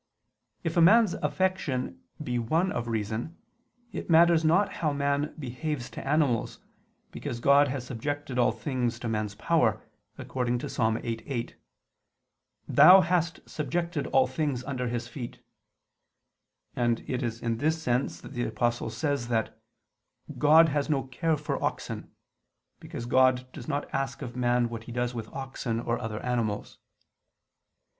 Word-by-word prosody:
If 165 Hz, 0 st, -2 dB
a -, -, +6 dB
man's 210 Hz, +2 st, +6 dB
affection 185 Hz, -9 st, -1 dB, 0.2 s
be 125 Hz, -3 st, -1 dB
one 165 Hz, +11 st, +1 dB
of 120 Hz, -1 st, -3 dB
reason, 115 Hz, +7 st, -3 dB, 0.5 s
it -, -, -6 dB
matters 165 Hz, 0 st, +6 dB
not 180 Hz, +6 st, +3 dB
how 155 Hz, -3 st, +2 dB
man 140 Hz, +1 st, 0 dB
behaves 135 Hz, -1 st, -4 dB
to -, -, -7 dB
animals, 140 Hz, -6 st, +1 dB, 0.5 s
because 120 Hz, -, -5 dB
God 140 Hz, +3 st, +5 dB
has 130 Hz, -2 st, -4 dB
subjected 135 Hz, +2 st, -3 dB
all 120 Hz, -, +4 dB
things 120 Hz, 0 st, -2 dB
to 120 Hz, -, -5 dB
man's 105 Hz, -2 st, -2 dB
power, 110 Hz, -3 st, +2 dB, 0.4 s
according 125 Hz, -1 st, -1 dB
to -, -, -5 dB
Ps. -, -, -8 dB
8:8: 115 Hz, +2 st, -1 dB, 1.1 s
"Thou 190 Hz, +1 st, +8 dB
hast 170 Hz, -3 st, -1 dB
subjected 170 Hz, 0 st, -2 dB
all 130 Hz, -, +4 dB
things 130 Hz, -1 st, -2 dB
under 130 Hz, -2 st, -3 dB
his 120 Hz, 0 st, -3 dB
feet": 120 Hz, -1 st, -7 dB, 1.4 s
and 120 Hz, -2 st, +1 dB
it 125 Hz, -, -2 dB
is 115 Hz, -2 st, -3 dB
in 115 Hz, -1 st, -1 dB
this 160 Hz, +3 st, +1 dB
sense 125 Hz, -3 st, -1 dB
that -, -, -10 dB
the 120 Hz, -2 st, -1 dB
Apostle 120 Hz, +1 st, -1 dB
says 140 Hz, 0 st, -2 dB
that 115 Hz, -2 st, -2 dB, 0.8 s
"God 160 Hz, +2 st, +7 dB
has 145 Hz, +1 st, -1 dB
no 140 Hz, -3 st, +1 dB
care 150 Hz, +5 st, -1 dB
for 150 Hz, -, -3 dB
oxen"; -, -, -3 dB, 0.7 s
because 155 Hz, -7 st, -7 dB
God 130 Hz, 0 st, +3 dB
does 125 Hz, -5 st, -9 dB
not 145 Hz, -1 st, -2 dB
ask 135 Hz, +1 st, -2 dB
of 120 Hz, -2 st, -7 dB
man 120 Hz, -1 st, +2 dB
what 115 Hz, -1 st, -7 dB
he -, -, -8 dB
does 120 Hz, +1 st, -1 dB
with 115 Hz, -3 st, -5 dB
oxen 130 Hz, -4 st, -3 dB
or 115 Hz, 0 st, -1 dB
other 110 Hz, -3 st, -4 dB
animals. 115 Hz, -4 st, -2 dB
130 Hz, 150 wpm, -28 LUFS, 120-150 Hz, 1.4 s, Thou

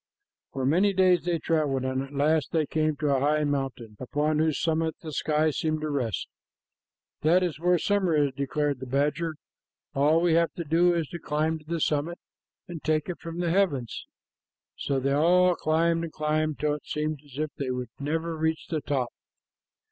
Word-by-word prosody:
For 135 Hz, -1 st, -3 dB
many 185 Hz, +9 st, +3 dB
days 185 Hz, -2 st, +3 dB
they 175 Hz, -1 st, +1 dB
traveled, 150 Hz, -5 st, 0 dB
and 130 Hz, 0 st, -1 dB
at 135 Hz, 0 st, -7 dB
last 150 Hz, +1 st, +2 dB
they 160 Hz, -2 st, +1 dB
came 155 Hz, +1 st, 0 dB
to 145 Hz, -1 st, +1 dB
a -, -, +2 dB
high 150 Hz, +2 st, +2 dB
mountain 135 Hz, -7 st, -3 dB
upon 150 Hz, +4 st, 0 dB
whose 155 Hz, -1 st, +1 dB
summit 160 Hz, 0 st, 0 dB
the 155 Hz, -2 st, -6 dB
sky 155 Hz, +1 st, +1 dB
seemed 155 Hz, +1 st, -1 dB
to 155 Hz, -1 st, -2 dB
rest. 120 Hz, -, -2 dB, 0.9 s
"That 175 Hz, +4 st, +4 dB
is 165 Hz, -5 st, -2 dB
where 180 Hz, +1 st, +3 dB
summer 190 Hz, -2 st, +1 dB
is," 145 Hz, -2 st, +2 dB
declared 140 Hz, 0 st, -1 dB
the 130 Hz, -, -7 dB
badger. 150 Hz, +5 st, 0 dB, 0.6 s
"All 150 Hz, +3 st, +3 dB
we 170 Hz, -1 st, +2 dB
have 170 Hz, 0 st, +3 dB
to 170 Hz, -, -4 dB
do 170 Hz, +3 st, +3 dB
is 165 Hz, -3 st, -1 dB
to 170 Hz, -, -6 dB
climb 155 Hz, +1 st, -1 dB
to 155 Hz, -, -20 dB
the 165 Hz, +1 st, -2 dB
summit 155 Hz, +3 st, 0 dB, 0.5 s
and 170 Hz, -3 st, -7 dB
take 155 Hz, +1 st, 0 dB
it 180 Hz, -, -4 dB
from 165 Hz, +1 st, -5 dB
the 170 Hz, -2 st, 0 dB
heavens." 165 Hz, -, 0 dB, 0.7 s
So 140 Hz, -1 st, -1 dB
they 140 Hz, +1 st, 0 dB
all 180 Hz, +5 st, +4 dB
climbed 165 Hz, +1 st, +1 dB
and 165 Hz, -, -5 dB
climbed, 155 Hz, 0 st, -1 dB
till 150 Hz, +2 st, 0 dB
it 150 Hz, -, -7 dB
seemed 150 Hz, 0 st, -2 dB
as 140 Hz, -2 st, -14 dB
if 155 Hz, 0 st, -2 dB
they 135 Hz, -2 st, -2 dB
would 125 Hz, -2 st, -3 dB
never 160 Hz, +3 st, -2 dB
reach 160 Hz, 0 st, -1 dB
the 155 Hz, -3 st, -1 dB
top. 130 Hz, -3 st, -1 dB
155 Hz, 195 wpm, -27 LUFS, 145-165 Hz, 0.9 s, That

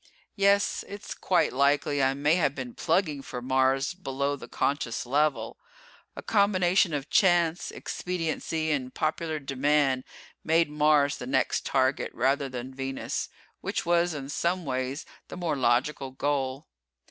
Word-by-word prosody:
Yes, 200 Hz, 0 st, +2 dB
it's 205 Hz, +1 st, -7 dB
quite 175 Hz, -4 st, +1 dB
likely 140 Hz, +1 st, +2 dB
I 135 Hz, 0 st, +2 dB
may 145 Hz, +2 st, +2 dB
have 155 Hz, -5 st, +1 dB
been 125 Hz, -3 st, -6 dB
plugging 155 Hz, -7 st, 0 dB
for 125 Hz, -, -6 dB
Mars 130 Hz, +3 st, +1 dB
below 140 Hz, -5 st, -2 dB
the 140 Hz, -, -10 dB
conscious 140 Hz, -5 st, -1 dB
level. 145 Hz, +3 st, 0 dB, 0.6 s
A -, -, -8 dB
combination 190 Hz, -3 st, +3 dB
of 140 Hz, 0 st, -5 dB
chance, 175 Hz, -3 st, +3 dB
expediency 160 Hz, -2 st, -3 dB
and 130 Hz, -4 st, -1 dB
popular 160 Hz, 0 st, -1 dB
demand 135 Hz, -1 st, +1 dB, 0.4 s
made 165 Hz, -1 st, +2 dB
Mars 150 Hz, -1 st, +3 dB
the 125 Hz, -, -7 dB
next 130 Hz, -1 st, 0 dB
target, 130 Hz, 0 st, +1 dB
rather 135 Hz, +2 st, +1 dB
than 130 Hz, +1 st, -6 dB
Venus, 135 Hz, 0 st, -4 dB, 0.3 s
which -, -, -3 dB
was, 170 Hz, -1 st, +2 dB
in 135 Hz, -1 st, -6 dB
some 170 Hz, +4 st, -1 dB
ways, 130 Hz, +2 st, -3 dB, 0.2 s
the -, -, -8 dB
more 170 Hz, -4 st, -1 dB
logical 130 Hz, +2 st, +1 dB
goal. 135 Hz, +1 st, -2 dB
145 Hz, 140 wpm, -27 LUFS, 135-165 Hz, 0.6 s, combination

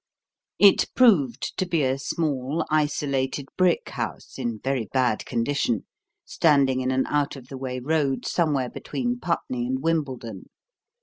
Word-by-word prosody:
It 200 Hz, -1 st, +6 dB
proved 145 Hz, -, +3 dB
to 185 Hz, -, +1 dB
be 165 Hz, -4 st, +1 dB
a 130 Hz, +1 st, 0 dB
small, 145 Hz, 0 st, -1 dB
isolated 140 Hz, -3 st, 0 dB
brick 185 Hz, -2 st, +2 dB
house -, -, -6 dB
in 120 Hz, -3 st, -2 dB
very 130 Hz, -4 st, -1 dB
bad 125 Hz, -4 st, +1 dB
condition, 120 Hz, -2 st, 0 dB, 0.4 s
standing 140 Hz, -5 st, +3 dB
in 130 Hz, -, -1 dB
an 130 Hz, 0 st, +1 dB
out 145 Hz, -1 st, 0 dB
of 130 Hz, -2 st, -12 dB
the 135 Hz, -, -7 dB
way 130 Hz, -1 st, -4 dB
road 140 Hz, 0 st, 0 dB
somewhere 145 Hz, -7 st, 0 dB
between 245 Hz, -1 st, -3 dB
Putney 125 Hz, -, -2 dB
and 130 Hz, +2 st, -2 dB
Wimbledon. 130 Hz, -, -2 dB
135 Hz, 140 wpm, -25 LUFS, 130-155 Hz, 0.4 s, It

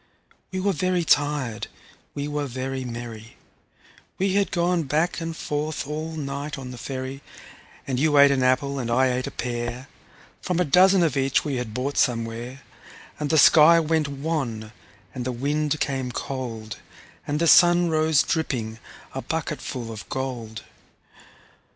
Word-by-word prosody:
We 185 Hz, -, -3 dB
were 195 Hz, +1 st, +1 dB
very 180 Hz, +2 st, 0 dB
tired, 145 Hz, -7 st, +1 dB, 0.5 s
we 145 Hz, 0 st, -3 dB
were 145 Hz, -1 st, -2 dB
very 130 Hz, +1 st, -4 dB
merry 115 Hz, -2 st, -8 dB, 0.8 s
We 190 Hz, 0 st, +1 dB
had 200 Hz, 0 st, +2 dB
gone 175 Hz, -1 st, +1 dB
back 160 Hz, +6 st, 0 dB
and 165 Hz, 0 st, -4 dB
forth 150 Hz, 0 st, -3 dB
all 155 Hz, +2 st, -4 dB
night 145 Hz, -1 st, -4 dB
on 130 Hz, -2 st, -7 dB
the 125 Hz, -, -9 dB
ferry, 130 Hz, +1 st, -5 dB, 0.6 s
And 130 Hz, -2 st, -2 dB
you 150 Hz, 0 st, +3 dB
ate 140 Hz, 0 st, +8 dB
an 135 Hz, -1 st, +1 dB
apple, 135 Hz, +2 st, +1 dB
and 120 Hz, -2 st, -3 dB
I 130 Hz, +2 st, +3 dB
ate 125 Hz, +1 st, -2 dB
a -, -, -2 dB
pear, 120 Hz, +1 st, -4 dB, 0.5 s
From 180 Hz, -1 st, -1 dB
a 180 Hz, -, +3 dB
dozen 185 Hz, +4 st, +5 dB
of 155 Hz, -6 st, +1 dB
each 135 Hz, +1 st, +1 dB
we 140 Hz, -3 st, -1 dB
had 115 Hz, -3 st, -5 dB
bought 135 Hz, +3 st, -2 dB
somewhere; 120 Hz, +1 st, -1 dB, 0.6 s
And 150 Hz, -1 st, -2 dB
the 160 Hz, -, +3 dB
sky 160 Hz, +3 st, +7 dB
went 160 Hz, -1 st, +1 dB
wan, 135 Hz, -7 st, -3 dB, 0.4 s
and 125 Hz, -, -4 dB
the 130 Hz, -, -2 dB
wind 145 Hz, +4 st, -1 dB
came 130 Hz, -3 st, -2 dB
cold, 115 Hz, -5 st, -5 dB, 0.5 s
And 145 Hz, -, 0 dB
the 170 Hz, -, +1 dB
sun 175 Hz, +1 st, +6 dB
rose 155 Hz, -2 st, +3 dB
dripping, 115 Hz, -9 st, -2 dB, 0.3 s
a -, -, -4 dB
bucketful 120 Hz, -3 st, -4 dB
of 110 Hz, -2 st, -9 dB
gold. 120 Hz, -5 st, -4 dB
140 Hz, 155 wpm, -24 LUFS, 125-155 Hz, 0.8 s, ate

